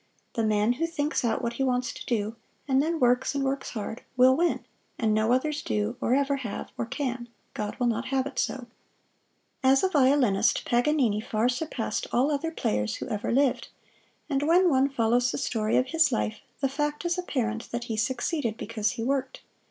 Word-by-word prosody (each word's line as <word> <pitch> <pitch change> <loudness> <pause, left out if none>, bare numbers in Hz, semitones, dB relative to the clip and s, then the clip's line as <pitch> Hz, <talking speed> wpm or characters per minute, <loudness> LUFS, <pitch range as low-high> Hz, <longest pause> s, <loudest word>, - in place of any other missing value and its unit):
The 230 - 0
man 215 +1 +2
who 330 +7 -1
thinks 300 -3 -1
out 225 -2 0
what 235 - -1
he 270 - -1
wants 250 -1 0
to - - -8
do, 220 -2 -1 0.3
and 265 -1 +3
then 325 +2 -1
works 250 +2 +2
and 280 - 0
works 270 0 -2
hard, 225 0 -5 0.2
will 255 +1 +6
win, 345 +3 0 0.3
and 220 -3 +1
no 215 +2 +2
others 295 +4 +1
do, 210 +3 -1
or 245 - +2
ever 280 0 +1
have, 235 -7 -6
or 230 - -3
can 245 -2 -3 0.2
God 210 -1 -4
will 245 - 0
not 235 +1 0
have 265 -1 0
it 280 -2 -4
so. 255 - -2 1.0
As 270 0 +4
a 380 - +3
violinist 265 - +3
Paganini 245 -4 +2
far 220 +1 0
surpassed 315 - -2
all 265 +5 +2
other 295 +3 -1
players 105 - -1
who - - -6
ever 210 -1 -2
lived; 270 +1 +2 0.6
and 275 -3 0
when 345 +4 +4
one 270 0 +3
follows 245 -1 +2
the - - -3
story 215 -2 0
of 255 +1 +1
his 325 -3 +3
life, 220 -2 -1 0.2
the 275 - +3
fact 295 +4 -2
is 345 +1 0
apparent 230 -10 -2
that 240 0 -3
he 230 -2 -4
succeeded 240 +1 -1
because 220 0 -2
he 230 -3 -4
worked. 265 +1 -2
255 Hz, 195 wpm, -27 LUFS, 225-280 Hz, 1.0 s, will